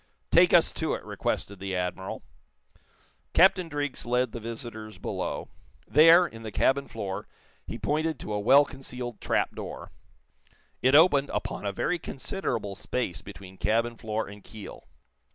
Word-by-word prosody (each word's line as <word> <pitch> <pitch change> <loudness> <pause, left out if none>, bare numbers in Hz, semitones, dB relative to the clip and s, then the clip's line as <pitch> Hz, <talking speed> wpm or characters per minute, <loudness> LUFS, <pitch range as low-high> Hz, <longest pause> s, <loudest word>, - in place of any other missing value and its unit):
"Take - - +6
us - - +5
to - - -1
it," - - -9
requested 100 -1 -3
the 95 0 -3
Admiral. 90 +1 -3 1.1
Captain 185 -1 +5
Driggs 145 -2 -3
led 125 0 +1
the 120 - -6
visitors 115 -1 -7
below. - - -4 0.4
There, 165 +4 +7
in 115 -9 -9
the 110 -1 -6
cabin 140 +5 +2
floor, 100 -4 -5 0.4
he - - -5
pointed 155 -1 -1
to 105 - -4
a 105 - 0
well 135 +7 +6
concealed 125 -4 -7
trapdoor. - - -2 0.9
It 130 +2 +4
opened 145 -4 +6
upon 105 0 -3
a - - 0
very 175 - -1
considerable 125 - -3
space 95 -3 -3
between 95 -1 -11
cabin 115 +4 +1
floor 110 0 -3
and 100 0 -11
keel. 110 -2 -11
115 Hz, 145 wpm, -27 LUFS, 105-145 Hz, 1.1 s, There